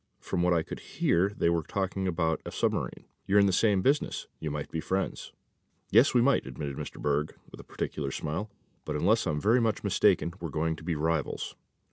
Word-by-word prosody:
From - - -2
what 90 0 +3
I 80 - +2
could - - -7
hear 85 +4 +1
they 100 - -1
were 85 -1 +2
talking 95 +3 -2
about 80 -2 0
a - - -6
submarine. - - -1 0.2
You're 100 - +4
in 100 - +6
the 95 - +2
same 100 -2 +3
business. 145 +2 +1
You 80 - -3
might 75 -1 -4
be 80 - -2
friends." 95 +4 -2 0.6
"Yes, 115 +6 +5
we 120 - +6
might," 140 +2 +2
admitted 70 -3 -5
Mr. - - -7
Berg 75 +1 -1
with - - -11
a - - -9
peculiar 70 -3 -4
smile; 80 +10 -3 0.3
"but, 75 - -4
unless 100 +8 +2
I'm 75 -2 0
very 115 +8 +3
much 110 -2 0
mistaken, 85 - +3
we're 85 - -4
going 80 +2 -1
to - - -12
be 85 0 -1
rivals." 80 -1 -1
85 Hz, 205 wpm, -29 LUFS, 80-100 Hz, 0.6 s, in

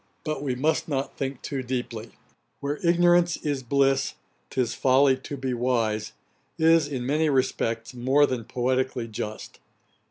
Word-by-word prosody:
But 155 -3 -3
we 135 -3 -1
must 150 +5 0
not 140 -3 -2
think 135 -1 -4
too 140 -2 -3
deeply; 120 -3 -4 0.5
'Where 145 +1 -3
ignorance 175 0 +4
is 145 -3 -2
bliss, 135 +1 +1 0.3
'tis 125 -4 -1
folly 135 +1 +4
to 140 +2 -7
be 130 -1 -2
wise,' 115 -3 0 0.4
is, 165 -2 +4
in 130 -4 -4
many 150 +4 +2
respects, 115 -4 0
more 130 +4 +3
than 125 -5 -3
poetically 125 0 -1
just. 105 -1 -6
130 Hz, 140 wpm, -26 LUFS, 125-145 Hz, 0.5 s, ignorance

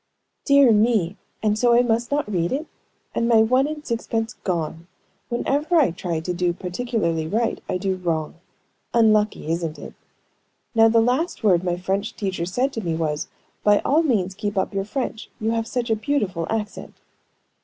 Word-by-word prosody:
"Dear 280 -3 +6
me! 210 -4 +2 0.3
And 215 0 +1
so 240 0 +4
I 245 - +5
must 235 0 0
not 290 -3 0
read 175 -4 -1
it? 290 +4 -2 0.5
and 235 - 0
my 225 -2 +6
one 255 +5 +3
and 300 0 -6
six 230 -2 -3
pence 225 +1 -1
gone! 165 -2 -3 0.4
Whenever 285 +7 0
I 295 - +5
try 170 -1 -3
to 180 +2 -3
do 175 0 0
particularly 180 -4 -2
right, 225 +6 -1
I - - 0
do 190 0 -1
wrong. 165 -4 -2 0.6
Unlucky, 215 -7 +3
isn't 165 -1 -2
it? - - -9 0.8
Now 225 -1 +6
the 230 0 +4
last 255 +8 0
word 185 -4 +4
my 175 -1 -1
French 195 +3 -2
teacher 190 -4 -3
said 255 +9 0
to 225 - -3
me 165 -2 -1
was, 155 -2 -2 0.4
'By 205 0 +5
all 305 +4 +3
means 210 - +1
keep 205 +1 -4
up 190 - 0
your 195 0 -1
French; 230 0 -4
you 220 0 0
have 225 0 -1
such 240 -1 -2
a - - +4
beautiful 210 - -1
accent.'" 215 -2 -4
215 Hz, 180 wpm, -23 LUFS, 180-240 Hz, 0.8 s, Dear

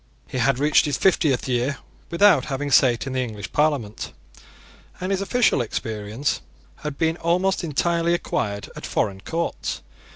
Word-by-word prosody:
He 130 - -4
had 130 +1 +2
reached 145 +2 +4
his 145 -2 0
fiftieth 155 -10 +2
year 125 +2 0 0.3
without 195 +1 +5
having 145 0 -3
sate 125 -3 +4
in 135 - -4
the 130 - 0
English 105 -5 -5
Parliament; 145 -9 0 0.9
and 185 +2 -3
his 195 0 0
official 205 - +2
experience 110 +3 -3 0.4
had 150 -2 -6
been 160 0 +1
almost 180 +3 +1
entirely 170 +2 +1
acquired 100 -10 -2
at - - -7
foreign 95 -1 -1
courts. 170 +8 -3
145 Hz, 150 wpm, -23 LUFS, 120-170 Hz, 0.9 s, without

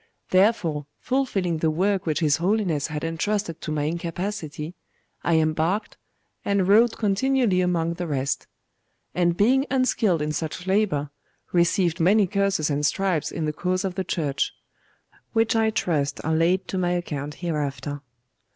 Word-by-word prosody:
Therefore, 185 -7 +2
fulfilling 200 -11 0
the 160 0 +1
work 185 +3 0
which 155 0 0
his 150 -2 +3
Holiness 180 -5 0
had 150 -1 -5
entrusted 165 +2 -2
to 155 - -4
my 150 -1 -1
incapacity, 170 0 -4 0.5
I 170 - +2
embarked, 160 +6 0 0.5
and 200 -2 +1
rowed 225 +4 +5
continually 220 -1 +2
among 170 -2 +1
the 175 0 -4
rest; 140 -2 -2 0.7
and 175 -1 +1
being 265 +7 +3
unskilled 225 - +2
in 150 - -1
such 160 +3 -4
labour, 190 -8 +1 0.4
received 175 0 +2
many 200 +5 +4
curses 195 -5 0
and 145 +1 -1
stripes 180 +1 +1
in 165 - -3
the 150 - -1
cause 185 +4 -1
of 190 - -2
the 190 +1 -2
Church 150 -6 -1 0.6
the - - -27 0.2
which 225 0 +2
I 220 -1 +3
trust 150 -10 -1
are 160 - +1
laid 175 +4 +2
to 190 - -1
my 175 -1 +1
account 150 -4 -3
hereafter. 145 -3 -3
175 Hz, 150 wpm, -24 LUFS, 155-200 Hz, 0.7 s, rowed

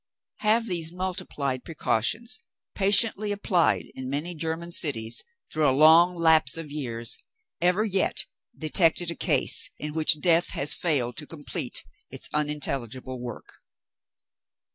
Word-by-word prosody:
Have 225 +2 +1
these 170 -6 -2
multiplied 180 -8 -4
precautions, 215 - -2 0.3
patiently 205 +1 +4
applied 190 -4 0
in 130 0 -7
many 150 +6 -3
German 165 +1 -5
cities, 115 -9 +1 0.3
through 155 -2 +2
a 130 - 0
long 165 +4 +6
lapse 160 -4 +3
of 160 -3 -7
years, 120 -6 -4 0.4
ever 180 +4 +2
yet 195 -3 -1 0.3
detected 165 +2 +1
a - - -6
case - - +3
in 150 0 -6
which 155 -1 +4
Death 170 +2 +2
has 145 +2 +1
failed 130 -8 0
to 150 - -5
complete 150 -3 -2 0.2
its - - -5
unintelligible 135 -4 -2
work? 120 -2 -10
160 Hz, 125 wpm, -25 LUFS, 140-180 Hz, 0.4 s, long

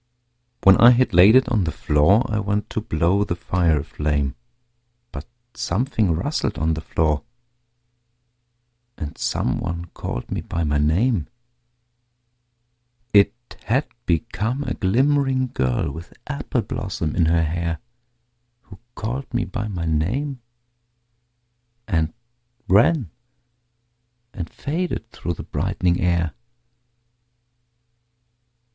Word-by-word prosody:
When 95 0 +8
I 120 - +8
had 125 +1 +3
laid 95 +7 +7
it 130 - +5
on 110 -5 +2
the 80 - -1
floor 75 - +3
I 110 -2 -1
went 105 0 -2
to 110 - -2
blow 95 0 +1
the 85 - -2
fire 85 -4 +1
a - - -8
flame, 75 -3 -1 0.8
But - - -8 0.3
something 110 - 0
rustled 140 - -2
on 80 +2 +1
the 80 - -4
floor, 75 -2 0 1.8
And 75 - -6
someone 85 +1 -2
called - - -5
me - - -2
by 85 - -3
my 75 -2 +1
name: 85 - +2 1.9
It 100 +3 +5 0.3
had 130 +6 +1 0.2
become 115 - -1
a 125 - -2
glimmering 130 +4 +1
girl 65 +4 0
With 80 +5 -10
apple 140 -4 -2
blossom 95 -9 -3
in 85 -3 +3
her 85 0 +3
hair 85 +1 -2 0.8
Who 100 -6 -15 0.2
called 125 +5 -4
me 120 -1 0
by 110 -2 -4
my 90 -5 -4
name 120 - -1 1.5
and 80 -6 0 0.6
ran 115 - +4 1.2
And 85 -3 -5
faded 155 -6 -3
through 85 - -4
the - - -7
brightening 85 -1 0
air. 85 -2 +1
95 Hz, 115 wpm, -22 LUFS, 80-120 Hz, 1.9 s, When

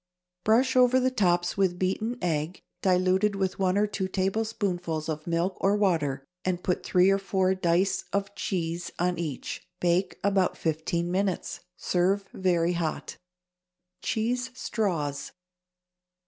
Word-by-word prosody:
Brush 250 +6 +3
over 255 0 +5
the 255 0 +2
tops 175 -7 +1
with 185 -3 +2
beaten 215 +6 -1
egg, 160 0 -1 0.2
diluted 185 +2 +3
with 190 -1 -1
one 185 0 +2
or 210 - +4
two 195 -2 -2
tablespoonfuls 185 -5 -1
of 155 0 -4
milk 170 +3 0
or 200 +1 +3
water, 155 -10 +1 0.2
and 180 -1 -1
put 180 - 0
three 185 +1 +4
or 195 - +2
four 190 -1 +1
dice 185 +1 +1
of 200 0 -1
cheese 170 -4 -2
on 175 0 0
each. 155 -6 -4 0.2
Bake 175 +2 +1
about 195 -2 +2
fifteen 170 +2 -1
minutes. 190 0 -1 0.2
Serve 190 +3 +1
very 175 -2 +1
hot. 170 -2 -3 0.8
=Cheese 245 +3 -1
Straws. 165 - -2
185 Hz, 135 wpm, -27 LUFS, 170-200 Hz, 0.8 s, over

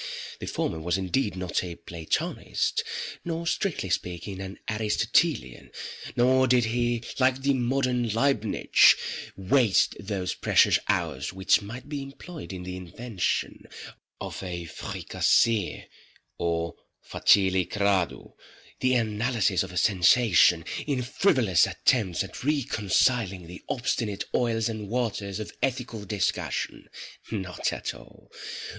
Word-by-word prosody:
The - - -6
former 80 - -2
was 85 +3 0
indeed 95 +3 -1
not 95 -1 -1
a 85 -2 -6
Platonist, 85 -2 -2 0.4
nor 170 0 -3
strictly 170 - -1
speaking 90 +2 -3
an 95 +1 -7
Aristotelian—nor 110 - 0
did 125 -1 +4
he, 120 +1 0 0.2
like 130 0 +2
the 140 0 +3
modern 125 -1 0
Leibnitz, 115 -1 +4 0.4
waste 100 +1 +3
those 95 -3 -3
precious - - +4
hours - - -1
which 95 +3 +3
might 120 +7 -8
be 145 -1 -4
employed 140 - -9
in 90 -1 -6
the 90 0 -5
invention 95 +3 -3 0.5
of - - -6
a 90 -2 -5
fricasée 110 +5 0 0.5
or, 85 -1 -1 0.3
facili 95 -2 +3
gradú, 100 -4 0 0.5
the 130 0 +2
analysis 110 -4 +1
of 95 - -4
a 90 - -6
sensation, 90 -3 +4 0.2
in 135 -4 0
frivolous 120 - +3
attempts 100 -10 +1
at 95 - -9
reconciling 115 - +1
the 90 +2 -10
obstinate 115 -5 -1
oils 115 -2 +1
and 110 -3 -5
waters 110 -4 -2
of 105 - -6
ethical 125 -5 -2
discussion. 100 -3 -2 0.4
Not 95 -6 -2
at - - -4
all. - - -16
105 Hz, 115 wpm, -27 LUFS, 95-125 Hz, 0.5 s, did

